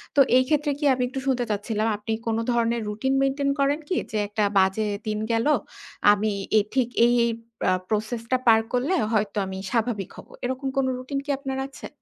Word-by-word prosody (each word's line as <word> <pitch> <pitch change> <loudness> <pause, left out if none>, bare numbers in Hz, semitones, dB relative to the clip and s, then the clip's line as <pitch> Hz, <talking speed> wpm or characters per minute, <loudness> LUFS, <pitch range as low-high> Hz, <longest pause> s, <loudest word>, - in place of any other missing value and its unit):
তো - - +4 0.2
এই 255 - +5
ক্ষেত্রে 300 0 +1
কি 295 - -1
আমি 250 -1 -1
একটু 265 +1 -5
শুনতে 250 -2 +1
চাচ্ছিলাম 215 +1 -1
আপনি 215 +2 -3
কোনো 225 0 +1
ধরনের 235 0 +1
রুটিন 220 +6 -1
মেইনটেইন 275 +1 +1
করেন 280 +2 +2
কি? 365 - -1 0.2
যে 215 - -1
একটা 210 +1 -1 0.2
বাজে 190 +3 +2 0.2
দিন 210 0 -1
গেল। 230 +2 +1 0.7
আমি 210 +1 +1 0.3
এথিক 245 +3 -1
এ - - +4
এই 240 -1 +3 0.3
পা - - +2 0.2
প্রসেস 220 +2 -1
টা 255 - +4
পার 225 -1 +7
করলে 265 +9 +1 0.2
হয়তো 210 -1 0
আমি 190 0 -6
স্বাভাবিক 225 -4 -1
হবো। - - -12
এরকম 260 +2 -2
কোন 270 - +3
রুটিন 260 +2 -4
কি 290 - -11
আপনার 270 -1 -4
আছে? 275 - -10
235 Hz, 195 wpm, -25 LUFS, 215-265 Hz, 0.7 s, পার